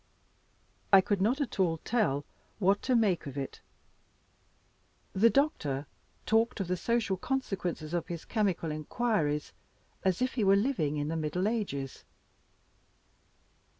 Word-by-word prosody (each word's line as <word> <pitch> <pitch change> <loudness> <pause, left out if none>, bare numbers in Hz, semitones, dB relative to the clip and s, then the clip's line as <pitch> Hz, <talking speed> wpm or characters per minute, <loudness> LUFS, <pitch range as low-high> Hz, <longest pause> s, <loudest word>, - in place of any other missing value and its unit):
I 195 - +10
could 195 0 0
not 240 +8 +2
at 255 -7 -3
all 170 -3 +2
tell 155 - 0 0.3
what 200 0 +2
to 255 - +1
make 200 -9 +2
of 140 0 -7
it. 135 -1 -5 1.5
The 220 +5 +5
doctor 150 - +1 0.4
talked 225 +1 +2
of 195 - -2
the 180 - 0
social 225 -1 0
consequences 180 - -3
of 175 -2 -1
his 170 -3 -6
chemical 195 -8 0
inquiries 155 -2 -1 0.5
as 185 -2 +1
if 255 0 0
he 230 - 0
were 195 0 +6
living 200 - +1
in 145 +1 -2
the 165 - -2
middle 160 +5 -1
ages. 190 - -3
190 Hz, 135 wpm, -30 LUFS, 155-225 Hz, 1.5 s, I